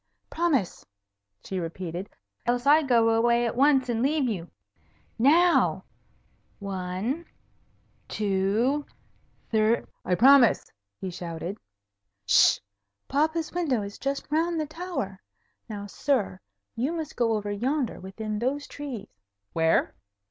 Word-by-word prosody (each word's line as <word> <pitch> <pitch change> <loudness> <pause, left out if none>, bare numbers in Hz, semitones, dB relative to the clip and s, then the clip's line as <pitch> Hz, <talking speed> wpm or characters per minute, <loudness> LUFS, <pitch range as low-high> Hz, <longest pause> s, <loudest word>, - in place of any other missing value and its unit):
"Promise!" 305 - 0 0.6
she 190 - -4
repeated, 175 +2 -5 0.4
"else 245 +1 +1
I 300 +3 +6
go 235 -5 +3
away 235 +1 +3
at 230 - -2
once, 270 0 +4
and 230 -2 -1
leave 290 +3 +2
you. 180 -7 -3 0.7
Now! 335 +8 +4 0.7
One 195 - -3 0.8
two 210 +8 +1 0.7
thrrr 220 +1 +3
" - - -46
"I - - +5
promise!" 260 +2 +5 0.3
he 190 - -4
shouted. 175 +3 -6 0.7
"'Sh! - - +6 0.5
Papa's 315 +3 0
window 290 -11 0
is 200 0 -8
just 275 +1 -2
round 330 +2 +1
the 310 - 0
tower. 310 - -5 0.5
Now, 205 -2 -5
sir, 205 -3 -1 0.4
you 260 +8 -1
must 320 -3 -5
go 235 -2 +2
over 205 -1 -2
yonder 255 +5 -1
within 210 +3 -5
those 275 +5 -1
trees." 275 -7 -7 0.5
"Where?" 160 0 +2
235 Hz, 120 wpm, -26 LUFS, 200-285 Hz, 0.8 s, I